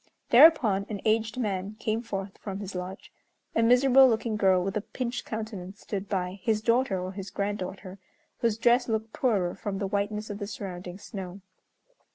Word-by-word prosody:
Thereupon 235 Hz, -8 st, +6 dB
an 210 Hz, -2 st, -4 dB
aged 220 Hz, +2 st, +1 dB
man 200 Hz, -3 st, -2 dB
came 220 Hz, +1 st, -1 dB
forth 195 Hz, -4 st, -5 dB
from 195 Hz, -1 st, -5 dB
his 200 Hz, -1 st, -6 dB
lodge. 180 Hz, +1 st, -7 dB, 0.4 s
A -, -, +3 dB
miserable 255 Hz, +3 st, +6 dB
looking 225 Hz, -1 st, 0 dB
girl 190 Hz, -3 st, +3 dB
with 195 Hz, +1 st, -3 dB
a 210 Hz, -, 0 dB
pinched 245 Hz, +2 st, -4 dB
countenance 210 Hz, -3 st, -6 dB
stood 200 Hz, -1 st, -5 dB
by, 185 Hz, -1 st, -2 dB
his 220 Hz, -3 st, +1 dB
daughter 235 Hz, -4 st, +2 dB
or 185 Hz, +1 st, -4 dB
his 195 Hz, 0 st, -7 dB
granddaughter, 195 Hz, -1 st, -4 dB, 0.4 s
whose 230 Hz, -2 st, +1 dB
dress 240 Hz, +2 st, +3 dB
looked 220 Hz, 0 st, -2 dB
poorer 205 Hz, -11 st, +1 dB
from 200 Hz, 0 st, -4 dB
the 200 Hz, -, -2 dB
whiteness 205 Hz, +2 st, -2 dB
of 205 Hz, -, -6 dB
the 205 Hz, -, -4 dB
surrounding 185 Hz, -3 st, -7 dB
snow. 195 Hz, -2 st, -8 dB
205 Hz, 175 wpm, -28 LUFS, 195-225 Hz, 0.4 s, Thereupon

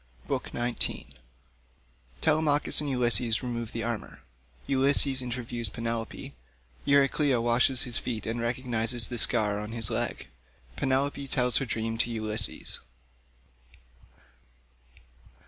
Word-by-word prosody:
BOOK -, -, -3 dB
XIX 120 Hz, -, -1 dB, 1.1 s
TELEMACHUS 150 Hz, -1 st, +3 dB
AND 145 Hz, -, -3 dB
ULYSSES 120 Hz, -2 st, +1 dB
REMOVE 120 Hz, -2 st, -4 dB
THE 115 Hz, -, -4 dB
ARMOUR—ULYSSES 120 Hz, -, -1 dB
INTERVIEWS 120 Hz, -2 st, -4 dB
PENELOPE—EURYCLEA 115 Hz, -, -1 dB
WASHES 120 Hz, +2 st, +3 dB
HIS 120 Hz, -2 st, 0 dB
FEET 115 Hz, -4 st, -5 dB
AND 115 Hz, +1 st, -3 dB
RECOGNISES 120 Hz, -1 st, 0 dB
THE 120 Hz, -, +1 dB
SCAR 105 Hz, -2 st, +5 dB
ON 105 Hz, +1 st, -6 dB
HIS 115 Hz, -3 st, +4 dB
LEG—PENELOPE 65 Hz, -, -3 dB
TELLS 125 Hz, -2 st, +2 dB
HER 135 Hz, -, 0 dB
DREAM 115 Hz, -1 st, -3 dB
TO 120 Hz, -, +1 dB
ULYSSES. 110 Hz, -2 st, -3 dB
115 Hz, 95 wpm, -28 LUFS, 110-130 Hz, 1.1 s, SCAR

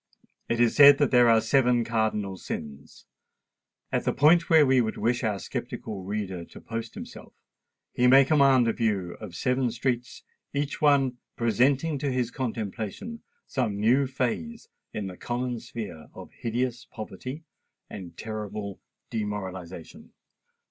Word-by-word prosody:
It 115 Hz, -, 0 dB
is 120 Hz, -1 st, +3 dB
said 140 Hz, -1 st, +9 dB
that 145 Hz, -2 st, +2 dB
there 120 Hz, -1 st, +6 dB
are 115 Hz, -1 st, +6 dB
Seven 120 Hz, +1 st, +3 dB
Cardinal 110 Hz, -4 st, -1 dB
Sins: 75 Hz, -6 st, -8 dB, 0.9 s
at -, -, 0 dB
the -, -, +1 dB
point 165 Hz, +4 st, +4 dB
where 160 Hz, -2 st, +7 dB
we 130 Hz, -1 st, +4 dB
would 110 Hz, -2 st, -2 dB
wish 120 Hz, +3 st, 0 dB
our 105 Hz, -3 st, 0 dB
sceptical 100 Hz, +1 st, -5 dB
reader 95 Hz, -2 st, -4 dB
to -, -, -13 dB
post 115 Hz, 0 st, -6 dB
himself, -, -, -10 dB, 0.6 s
he 125 Hz, -, +3 dB
may 135 Hz, +2 st, +7 dB
command 135 Hz, -4 st, +4 dB
a 115 Hz, -, +2 dB
view 100 Hz, -6 st, -1 dB
of 85 Hz, -, -8 dB
seven 125 Hz, +6 st, +1 dB
streets, 120 Hz, +1 st, -3 dB, 0.3 s
each 145 Hz, 0 st, -2 dB
one 135 Hz, -4 st, +3 dB, 0.2 s
presenting 135 Hz, +6 st, +2 dB
to 140 Hz, 0 st, -1 dB
his 125 Hz, -2 st, -1 dB
contemplation 115 Hz, -, -4 dB, 0.2 s
some 110 Hz, -7 st, -2 dB
new 125 Hz, +6 st, +3 dB
phase 135 Hz, -, -3 dB, 0.2 s
in 105 Hz, -, -4 dB
the 90 Hz, -2 st, -7 dB
common 120 Hz, 0 st, -3 dB
sphere 105 Hz, -10 st, -8 dB
of -, -, -10 dB
hideous 120 Hz, +1 st, -3 dB
poverty 130 Hz, -, -7 dB, 0.4 s
and 90 Hz, -4 st, -9 dB
terrible 105 Hz, -2 st, -5 dB, 0.3 s
demoralisation. 95 Hz, -6 st, -6 dB
115 Hz, 140 wpm, -27 LUFS, 105-130 Hz, 0.9 s, said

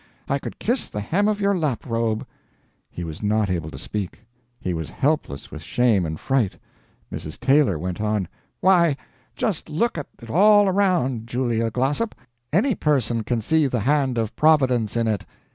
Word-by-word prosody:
I 140 Hz, -, 0 dB
could -, -, -7 dB
kiss 245 Hz, +4 st, 0 dB
the 105 Hz, -, -4 dB
hem 180 Hz, -, +1 dB
of 210 Hz, -1 st, +1 dB
your 200 Hz, 0 st, +2 dB
laprobe." 115 Hz, -8 st, -1 dB, 0.6 s
He 85 Hz, -, -6 dB
was 80 Hz, -2 st, -7 dB
not 105 Hz, -1 st, +1 dB
able 85 Hz, -4 st, -2 dB
to -, -, -9 dB
speak; 105 Hz, +2 st, -5 dB, 0.3 s
he 90 Hz, -, -2 dB
was 80 Hz, -2 st, -4 dB
helpless 135 Hz, -, -1 dB
with 80 Hz, -, -7 dB
shame 105 Hz, -1 st, +2 dB
and 80 Hz, 0 st, -5 dB
fright. 130 Hz, -8 st, 0 dB, 0.6 s
Mrs. 75 Hz, -, -6 dB
Taylor 135 Hz, -, +3 dB
went 90 Hz, +4 st, -4 dB
on: 105 Hz, -4 st, 0 dB, 0.3 s
"Why, 170 Hz, -6 st, +4 dB, 0.4 s
just 210 Hz, -8 st, -2 dB
look 170 Hz, +3 st, 0 dB
at 145 Hz, -, -6 dB
it 115 Hz, -1 st, -9 dB
all 205 Hz, +3 st, +6 dB
around, 175 Hz, -, +1 dB
Julia 120 Hz, -2 st, 0 dB
Glossop. 135 Hz, -, -1 dB, 0.4 s
Any 215 Hz, -, +3 dB
person 120 Hz, -, +1 dB
can 115 Hz, +1 st, -1 dB
see 155 Hz, +6 st, +2 dB
the 125 Hz, -4 st, -1 dB
hand 135 Hz, 0 st, +1 dB
of 110 Hz, -2 st, -2 dB
Providence 130 Hz, -8 st, +3 dB
in 115 Hz, -1 st, +1 dB
it. 105 Hz, -3 st, 0 dB
125 Hz, 170 wpm, -23 LUFS, 105-155 Hz, 0.6 s, all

